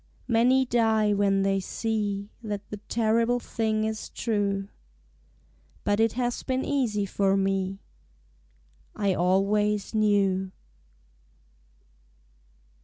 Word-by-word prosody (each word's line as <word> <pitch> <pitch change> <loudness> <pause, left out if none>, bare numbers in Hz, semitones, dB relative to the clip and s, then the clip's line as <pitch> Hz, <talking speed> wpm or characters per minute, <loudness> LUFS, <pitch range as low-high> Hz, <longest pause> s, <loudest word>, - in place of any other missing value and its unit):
Many 250 +3 +3
die 220 -3 +2
when 200 -1 +2
they 195 0 +1
see 205 0 -3
That 210 -3 -5
the 210 - -4
terrible 230 +2 +2
thing 220 -2 -1
is 220 0 -3
true. 200 -3 -1 1.2
But 205 +1 +1
it 225 -1 +3
has 245 0 -2
been 260 0 -2
easy 230 -8 0
for 195 0 +1
me: 195 0 0 1.2
I 200 -2 +1
always 200 +4 +1
knew. 200 -3 +2
210 Hz, 100 wpm, -26 LUFS, 195-225 Hz, 1.2 s, Many